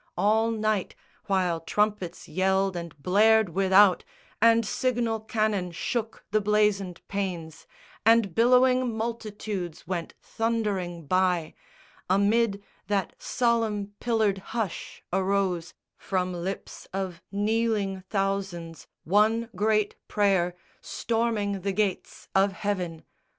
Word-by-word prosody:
All 220 +2 +3
night, 215 -3 -1 0.3
while 185 -4 +1
trumpets 205 +1 -1
yelled 190 +3 +1
and 170 -3 -6
blared 220 +2 +4
without, 190 +2 +5 0.4
And 230 0 +5
signal 235 -1 0
cannon 215 -4 -1
shook 225 +6 -3
the 215 0 +2
blazoned 205 -3 +1
panes, 180 -6 -4 0.4
And 225 -5 +4
billowing 250 +1 +4
multitudes 215 -6 -4
went 175 -3 -4
thundering 205 -7 -2
by, 180 -1 +1 0.6
Amid 200 +1 +2 0.2
that 195 -3 0
solemn 225 -4 0
pillared 220 -5 +1 0.2
hush 210 -7 -4
arose 190 -3 0 0.2
From 185 -1 -2
lips 180 +3 -6
of 190 -3 -4
kneeling 205 -2 0
thousands 195 -5 -2 0.2
one 220 +5 +2
great 210 +1 +1
prayer 190 -4 +2 0.3
Storming 225 -4 -1
the 195 +1 -1
Gates 200 -2 -2
of 195 0 +3
Heaven! 180 -5 -3
200 Hz, 105 wpm, -27 LUFS, 185-220 Hz, 0.6 s, without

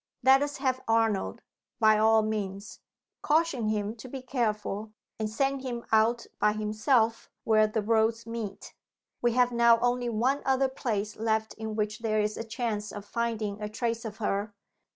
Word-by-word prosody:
Let 265 +2 +6
us 290 0 -2
have 260 -2 0
Arnold, 225 -3 +1 0.4
by 215 -2 +5
all 220 0 +5
means. 205 -2 -4 0.4
Caution 300 -7 +1
him 210 0 -1
to 240 - -10
be 260 0 -7
careful; 215 -4 -2 0.3
and 215 -1 -1
send 270 +4 0
him 240 -3 -5
out 225 +2 +3
by 210 0 +3
himself, 220 +2 +1
where 215 -1 +4
the 215 0 -2
roads 225 +1 +1
meet. 230 -4 -6 0.5
We 240 -1 +2
have 245 0 +3
now 235 -1 +5
only 245 0 0
one 250 +5 +1
other 265 0 +2
place 215 -5 -3
left 220 0 0
in 220 -1 -5
which 215 +1 -2
there 215 -2 0
is 210 0 0
a - - -4
chance 225 -2 -3
of 205 -1 -8
finding 220 -2 -2
a 210 - -3
trace 230 +1 -2
of 220 -2 -6
her. 205 -1 -2
225 Hz, 170 wpm, -28 LUFS, 215-240 Hz, 0.5 s, Let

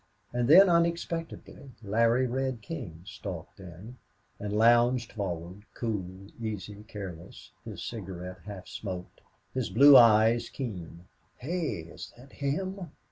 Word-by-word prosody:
And 120 -1 0
then, 185 +7 +9
unexpectedly, 170 -5 -1
Larry 115 +5 +2
Red 130 -2 -2
King 80 -3 -7
stalked 95 -3 -8
in 95 +7 -11 0.4
and 105 0 -4
lounged 120 +2 +4
forward, 90 -2 -5
cool, 100 -4 -4 0.2
easy, 105 -1 -5
careless, 95 -6 -9
his - - -7
cigarette 90 -4 -7
half 100 -2 -8
smoked, 90 -4 -7 0.3
his 130 -3 -2
blue 140 +8 +8
eyes 115 -1 +6
keen. 90 - -7 0.3
"Hey! 155 - -3
is 80 0 -10
that 130 +3 -15
him?" 185 +6 -3
110 Hz, 120 wpm, -29 LUFS, 95-130 Hz, 0.4 s, then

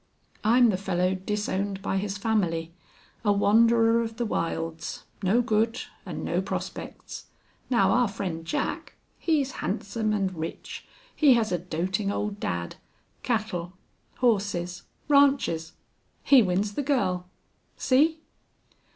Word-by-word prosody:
"I'm 235 +1 +5
the 185 - -1
fellow 185 -1 0
disowned 195 0 -2
by 195 - 0
his 200 +1 -2
family 175 -7 0 0.5
a 205 - +3
wanderer 230 +3 +4
of 225 -1 -5
the 240 - -1
wilds 165 -4 -3 0.2
no 215 +6 +3
good 225 +2 +1 0.3
and - - -5
no - - 0
prospects.... - - -6 0.4
Now 245 -2 +3
our 245 0 +3
friend 185 -5 -4
Jack, 165 - -3 0.2
he's 295 -5 +1
handsome 215 +5 -2
and 195 -3 0
rich. 160 0 -6 0.3
He 285 -5 +6
has 225 -3 +1
a 180 - 0
doting 185 +4 -2
old 205 0 -3
dad. 85 - -3 0.4
Cattle, 200 -7 -2 0.4
horses 195 -7 0 0.3
ranches! 275 - +3 0.5
He 275 -3 +7
wins 200 +1 0
the 290 - -1
girl. 190 -11 0 0.5
See!" 310 +5 +3
205 Hz, 125 wpm, -26 LUFS, 180-230 Hz, 0.5 s, He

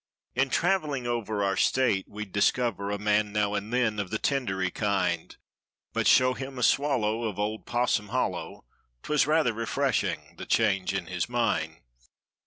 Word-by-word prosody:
In 135 +2 +1
traveling 155 -6 0
over 110 -4 -1
our 95 0 +1
State 105 -4 +2
we'd 105 -1 -7
discover 100 0 +1
A 100 - -1
man 105 0 +1
now 105 -1 0
and 105 +2 -3
then 120 -4 +1
of 100 -3 -3
the 110 - -1
tindery 95 -9 -1
kind; 95 -5 -1 0.6
But - - +1
show 130 0 +5
him 135 0 -7
a 125 - -2
swallow 120 -5 +2
of 105 -4 -3
"Old 105 0 -3
Possum 120 -3 +1
Hol¬ - - +1
low"— - - -8 0.4
'Twas 150 -3 +2
rather 150 -6 +3
refreshing—the 115 0 -2
change 100 -5 +1
in - - -2
his - - -3
mind. - - -1
110 Hz, 160 wpm, -27 LUFS, 100-125 Hz, 0.6 s, show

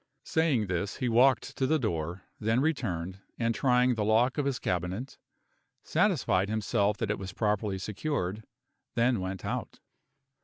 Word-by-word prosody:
Saying 155 -9 +2
this, 95 +1 -2
he 130 - -1
walked 120 +1 +3
to 130 - +1
the 160 - +3
door; 90 - -2 0.2
then 110 +3 +2
returned, 95 - -1 0.2
and 115 -1 +1
trying 125 0 +3
the 110 -3 -1
lock 115 +7 +3
of 145 - +1
his 135 -3 0
cabinet, 90 +9 -3 0.6
satisfied 95 +2 +2
himself 105 -1 +1
that 110 -2 -1
it 105 - -2
was 95 -1 -6
properly 105 -1 0
secured; 105 -1 -3 0.5
then 120 -1 +3
went 95 0 -4
out. - - -4
110 Hz, 150 wpm, -29 LUFS, 95-125 Hz, 0.6 s, walked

